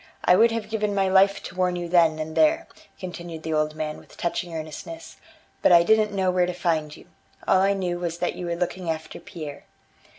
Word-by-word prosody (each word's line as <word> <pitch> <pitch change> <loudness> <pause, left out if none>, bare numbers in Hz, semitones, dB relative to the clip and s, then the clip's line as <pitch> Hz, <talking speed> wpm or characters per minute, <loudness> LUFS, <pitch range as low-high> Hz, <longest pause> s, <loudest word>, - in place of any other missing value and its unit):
I 180 - +6
would 230 +5 +6
have 225 -2 -3
given 210 -2 -1
my 195 -1 +2
life 195 +1 +4
to - - -8
warn 180 -1 +1
you 175 -1 -4
then 165 -2 +4
and 155 0 -5
there," 320 +2 +3 0.3
continued 175 -3 -7
the 160 - -2
old 155 0 0
man 155 -1 -4
with - - -18
touching 170 0 -2
earnestness, 160 - -8 0.4
"but - - +4
I 170 -1 +8
didn't 215 +3 +3
know 190 -2 +1
where 180 -1 +2
to 180 - -2
find 160 -4 -1
you. - - -16 0.4
All 185 - +4
I 195 +1 +3
knew 180 -3 -2
was 170 -1 -3
that - - -1
you 180 - -6
were 170 - -1
looking 180 0 -3
after 160 0 -4
Pierre." 155 -6 -9
175 Hz, 220 wpm, -24 LUFS, 160-195 Hz, 0.4 s, I